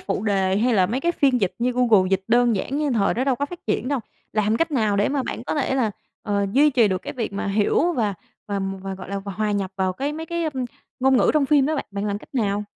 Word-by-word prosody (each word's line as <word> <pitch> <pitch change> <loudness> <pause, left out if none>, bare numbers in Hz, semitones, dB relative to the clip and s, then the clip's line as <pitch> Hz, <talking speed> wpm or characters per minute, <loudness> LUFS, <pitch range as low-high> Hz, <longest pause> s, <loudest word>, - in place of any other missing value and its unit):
phụ 195 0 -3
đề 195 -2 +1
hay 235 +3 +2
là 185 -2 +4
mấy 245 +6 -2
cái 345 +4 +1
phiên 270 -7 +2
dịch 190 - 0
như 245 +1 +1
Google 230 -7 +4
dịch 190 0 +1
đơn 240 -1 +4
giản 270 +9 -2
như 300 -2 0
thời 210 -5 +2
đó 250 - 0
đâu 270 -1 +2
có 285 - -1
phát 350 +3 -9
triển 225 +3 -1
đâu, 280 -2 0 0.3
làm 215 +1 +1
cách 330 +4 0
nào 215 -8 +1
để 205 - +2
mà 275 -1 0
bạn 240 - -5
có - - -2
thể 275 -3 0
là, 245 -5 +1 0.3
ờ, 200 -2 0
duy 295 +4 +5
trì 235 -5 +4
được 185 -1 -2
cái - - -5
việc 230 -5 -4
mà 200 +1 -3
hiểu 215 - +2
và 215 -9 0 0.3
và 200 -1 -1 0.2
và, 195 0 -4
gọi 185 -1 -10
là, 200 0 -3
và 200 0 -6
hòa 215 +2 -1
nhập 195 -2 -1
vào 190 -1 0
cái 275 +10 -3
mấy 320 +2 -6
cái, 340 0 -2
ưm, 270 -5 -2 0.4
ngôn 265 0 +4
ngữ - - +4
trong 295 -3 +3
phim 285 -2 +4
đó 310 - 0
bạn? - - -2
Bạn 200 0 -4
làm 205 -1 -2
cách 220 - -18
nào? 210 -4 0
230 Hz, 285 wpm, -23 LUFS, 200-270 Hz, 0.4 s, duy